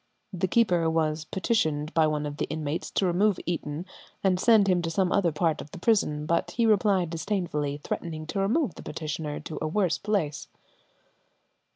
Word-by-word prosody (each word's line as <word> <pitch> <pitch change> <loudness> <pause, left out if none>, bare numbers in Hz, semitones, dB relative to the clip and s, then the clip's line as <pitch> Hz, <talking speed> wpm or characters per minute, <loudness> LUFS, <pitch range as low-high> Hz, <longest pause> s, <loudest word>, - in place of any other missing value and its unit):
The 185 +1 0
keeper 175 -5 +3
was 160 -1 0
petitioned 160 -7 0
by 160 -1 +4
one 150 -1 -1
of 145 0 -5
the - - -1
inmates 155 +1 -3
to 195 - 0
remove 185 +2 +2
Eaton 160 -1 -3 0.4
and 185 -2 +2
send 220 -2 +5
him 180 -2 +3
to 165 - -2
some 180 +2 +1
other 180 -4 +2
part 160 +1 0
of - - -10
the 185 - -10
prison, 170 -7 +1
but 170 +2 0
he 235 - +3
replied 200 -5 +3
disdainfully, 160 -5 -2
threatening 160 -2 -4
to 165 +5 -3
remove 220 - +1
the - - -11
petitioner 150 -1 -4
to 155 - -6
a 155 - 0
worse 180 +1 +1
place. 195 -9 -1
170 Hz, 180 wpm, -27 LUFS, 155-195 Hz, 0.4 s, send